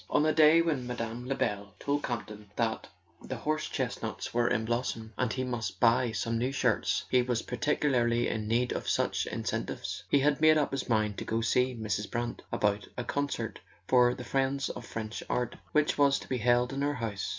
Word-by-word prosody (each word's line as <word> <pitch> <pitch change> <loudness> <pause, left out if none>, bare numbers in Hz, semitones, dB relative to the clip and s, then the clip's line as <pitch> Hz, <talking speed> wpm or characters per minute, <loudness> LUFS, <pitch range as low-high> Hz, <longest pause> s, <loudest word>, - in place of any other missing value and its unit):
On 145 - +3
the 155 0 +3
day 160 +1 +6
when 145 -7 -1
Mme. 120 0 -4
Lebel 105 -6 -2
told 145 +1 0
Campton 105 -5 -5
that 115 -2 -1 0.3
the 130 - -5
horse 155 +5 -2
chestnuts - - -3
were 120 0 +2
in 110 -1 +1
blossom 115 -1 -2
and 125 - 0
he 130 - -2
must 120 -3 -3
buy 120 0 +4
some 115 +1 -1
new 125 +3 0
shirts 135 - +1
he 125 - +5
was 120 -2 -1
particularly 120 -2 +1
in 110 -1 -2
need 120 +3 +1
of - - -3
such - - +1
incentives. - - -3
He 140 - +4
had 145 +1 +2
made 155 0 +7
up 150 - +1
his 135 -1 -3
mind 110 -3 +1
to - - -4
go 115 +1 -1
to 115 - -1
see 125 0 +2
Mrs. 105 -2 -2
Brant 120 0 -3
about 105 -1 0
a 125 - -2
concert 140 +3 -2 0.3
for 125 -1 +5
"The 125 - -7
Friends 135 +1 0
of 120 -1 -7
French 110 0 -5
Art" 125 -1 -1 0.2
which 150 -1 +2
was 140 -1 +5
to - - -9
be 130 -1 -1
held 120 +2 +3
in 135 - -2
her 145 +1 +1
house. 110 -5 -3
125 Hz, 205 wpm, -30 LUFS, 115-135 Hz, 0.3 s, made